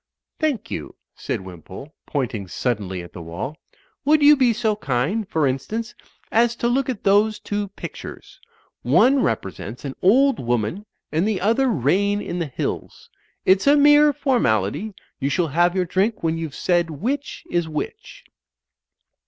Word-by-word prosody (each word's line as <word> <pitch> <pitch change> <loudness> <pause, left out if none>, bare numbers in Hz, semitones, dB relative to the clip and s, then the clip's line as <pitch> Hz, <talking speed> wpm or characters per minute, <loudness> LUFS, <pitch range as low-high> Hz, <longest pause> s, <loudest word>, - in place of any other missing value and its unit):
"Thank 295 -9 -1
you," 75 - -5 0.2
said - - -4
Wimpole, 95 - -11
pointing 115 -9 -2
suddenly 95 -4 -2
at 85 - -13
the 90 - -8
wall. 85 - -5 0.5
"Would 300 +1 +4
you 295 +1 +8
be 255 -4 +3
so 220 -1 0
kind, 170 - -1
for 160 -5 +1
instance, 215 - -2 0.4
as 235 +1 +3
to 235 - -1
look 265 +2 +1
at 245 -6 -4
those 210 +2 +3
two 205 0 -3
pictures. 395 - -9 0.4
One 270 +1 +4
represents 105 - -3
an 135 - -4
old 265 +8 +4
woman 120 - -2 0.2
and 160 +6 +1
the 210 -4 0
other 230 +7 +2
rain 200 - +1
in 180 -3 -4
the 165 - -2
hills. 130 - -5 0.3
It's 190 +6 +4
a 290 +1 +6
mere 295 +1 +6
formality. 215 - 0 0.2
You 140 -1 0
shall 170 +1 0
have 175 +5 +2
your 185 -1 +1
drink 190 +5 0
when 165 0 +1
you've 160 -4 -5
said 175 -2 +1
which 250 - -3
is 170 -2 0
which." 155 -1 -6
190 Hz, 155 wpm, -22 LUFS, -, 0.5 s, you